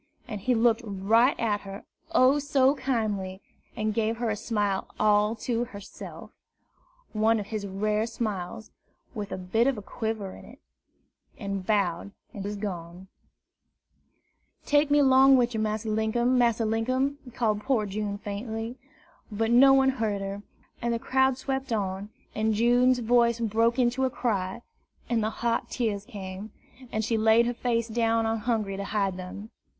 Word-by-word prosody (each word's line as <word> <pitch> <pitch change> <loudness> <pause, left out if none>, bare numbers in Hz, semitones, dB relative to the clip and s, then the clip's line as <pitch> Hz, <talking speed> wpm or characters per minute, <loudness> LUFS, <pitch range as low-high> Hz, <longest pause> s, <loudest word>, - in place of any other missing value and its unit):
And 210 -4 -6
he 250 +4 +1
looked 230 0 +3
right 220 +5 +2
at 210 -3 0
her, 195 +1 -9 0.3
oh, 280 -3 +5
so 280 -2 +3
kindly! 215 -9 -2 0.4
and 215 0 -1
gave 225 +1 0
her 235 -1 -1
a - - -1
smile 210 -3 -1
all 210 +1 +3
to 235 +1 -2
herself 205 -4 -10 0.8
one 220 +1 +3
of 205 - -4
his 210 -1 -4
rare 210 +3 0
smiles, 215 -3 -4 0.4
with 205 -4 -5
a - - -3
bit 205 +7 +1
of 270 -4 +1
a 210 - -7
quiver 220 -3 -4
in - - -13
it, - - -15 0.8
and 195 -3 -4
bowed, 200 -2 0 0.2
and 200 - -6
was 205 +1 -4
gone. 185 -2 -6 1.6
"Take 290 0 +3
me 290 0 +5
'long 265 0 +6
wid 245 -1 +1
yer, 220 - -2
Massa 215 +1 -2
Linkum, 220 +3 +1
Massa 235 -2 +2
Linkum!" 255 +6 0 0.2
called 215 -4 0
poor 255 -5 +1
June 205 0 -3
faintly. 225 +3 -5 0.5
But 225 +2 0
no 265 +3 +7
one 270 0 +5
heard 220 -6 -1
her; 195 +1 -5 0.4
and 235 - 0
the - - 0
crowd 265 +2 +2
swept 265 -1 -3
on, 200 -2 -2 0.2
and 220 0 0
June's 245 +3 +4
voice 235 0 +3
broke 230 +2 +1
into 250 +1 +2
a - - +1
cry, 220 -3 -2 0.4
and 235 -2 +1
the 215 - +1
hot 235 +1 -1
tears 210 -5 -2
came, 200 -2 -8 0.4
and 220 0 -1
she 230 -1 0
laid 220 +2 +5
her 240 - -1
face 235 -1 -1
down 230 0 +1
on 225 0 0
Hungry 215 -4 -1
to 200 - -4
hide 200 -2 -1
them. 195 +4 -8
220 Hz, 165 wpm, -27 LUFS, 205-240 Hz, 1.6 s, no